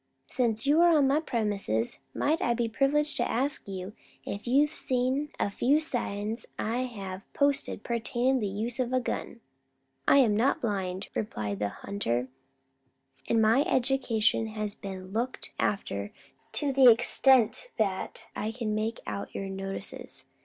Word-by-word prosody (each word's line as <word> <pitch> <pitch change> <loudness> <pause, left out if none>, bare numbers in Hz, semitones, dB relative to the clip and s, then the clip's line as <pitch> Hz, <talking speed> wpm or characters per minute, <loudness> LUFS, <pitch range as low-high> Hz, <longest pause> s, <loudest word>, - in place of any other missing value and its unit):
"Since 235 -3 0
you 295 +4 +4
are 345 -2 +6
on 285 - +4
my 280 +3 +3
premises, 205 - 0
might 310 +3 0
I 235 - +1
be 235 -1 0
privileged 295 +6 +1
to - - 0
ask 275 +4 -1
if 195 +2 -8
you 265 +4 +5
have 300 +1 +1
seen 260 +3 -1
a 200 - 0
few 275 +8 +3
signs 225 -7 -3
'at - - -2
I 230 +2 -1
have 195 -5 -8
posted 280 -6 0
pertainin' 240 +2 0
to - - -1
the 210 - -1
use 225 +5 -3
of 255 0 -1
a 255 - +3
gun?" 240 -1 -4 0.7
"I - - +6
am 235 -7 +5
not 245 +6 +2
blind," 190 -4 -3
replied 105 - -3
the 105 -1 0
hunter; 125 - -3 1.0
"and 225 -1 +3
my 225 +5 +5
education 240 -5 +1
has 215 -1 -3
been 190 -2 -8
looked 235 +5 -3
after 100 - -1 0.4
to 285 -3 +2
the 260 -2 +8
extent 245 - +5
that 195 -4 -2
I 215 - -2
can 225 -2 -3
make 220 +2 -2
out 200 - -5
your 195 0 -4
notices. 195 0 -6
230 Hz, 160 wpm, -28 LUFS, 200-265 Hz, 1.0 s, the